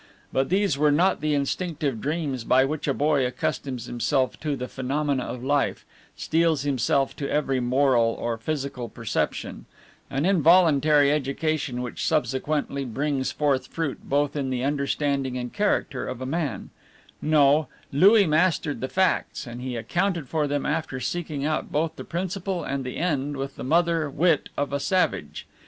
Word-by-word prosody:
But 135 0 +1
these 190 -6 +1
were 150 0 +4
not 175 +6 +2
the 155 -1 +1
instinctive 145 - -2
dreams 145 -5 -2
by 130 +3 +4
which 150 +2 -3
a 140 - +2
boy 145 -2 +2
accustoms 125 0 -3
himself 130 0 0
to 150 -2 -2
the 125 -1 -5
phenomena 135 +1 -1
of 125 -1 -6
life, 140 +1 0 0.3
steels 160 -3 +1
himself 135 0 +1
to 140 - -3
every 135 -3 +1
moral 125 -2 +2
or 120 -1 -1
physical 135 -2 -3
perception 115 +1 -3 0.4
an 135 +4 -1
involuntary 155 -5 +5
education 145 -2 -1
which 125 - -5
subsequently 145 -1 0
brings 135 +2 -1
forth 135 -3 0
fruit 160 -3 -3
both 145 +1 0
in 140 -3 -1
the 125 -1 -2
understanding 140 -2 -1
and 125 -1 -5
character 205 -10 0
of 130 -1 -5
a 130 - -4
man; 140 - -3 0.5
no, 150 0 +4 0.2
Louis 200 +8 +6
mastered 155 -1 +1
the 130 - -1
facts, 185 0 0
and 120 0 -8
he 125 -1 -4
accounted 170 - -1
for 155 0 0
them 145 -1 -1
after 150 -3 -2
seeking 150 +1 -3
out 155 0 -1
both 155 +2 0
the - - -7
principle 185 +1 -3
and 140 -1 -3
the 125 - -5
end 145 -4 -1
with 135 0 -4
the - - -7
mother 165 +1 +2
wit 160 +2 +2
of 145 0 -1
a 140 - 0
savage. 95 - -1
145 Hz, 160 wpm, -25 LUFS, 130-155 Hz, 0.5 s, Louis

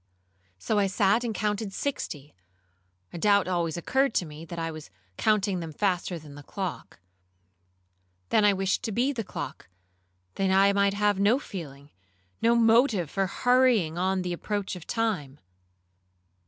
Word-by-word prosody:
So 210 - 0
I 200 - +3
sat 205 +3 +2
and 235 - -2
counted 210 -1 -2
sixty; 150 - -4 0.8
a 170 - -6
doubt 200 0 +3
always 170 -3 -1
occurred 265 +8 +1
to 180 - +1
me, 155 +1 -10
that 170 +1 -8
I 165 0 -2
was 155 -6 -10 0.3
counting 200 - +1
them 165 -2 -6
faster 180 +1 -1
than 150 -3 -12
the 145 - -10
clock. 190 - -6 1.3
Then 215 - +3
I 205 - +6
wished 195 -1 0
to 225 - -2
be 250 +7 +1
the 230 -4 -3
clock, 190 - -7 0.7
that 195 -1 0
I 195 +1 +4
might 200 0 +2
have 205 -1 +1
no 210 +5 +4
feeling, 145 - -9 0.5
no 230 +1 +4
motive 225 - +3
for 195 -1 0
hurrying 245 -8 +2
on 185 0 0
the 180 -1 -2
approach 200 +2 -3
of 180 - -11
time. 190 - -2
195 Hz, 155 wpm, -27 LUFS, 170-215 Hz, 1.3 s, I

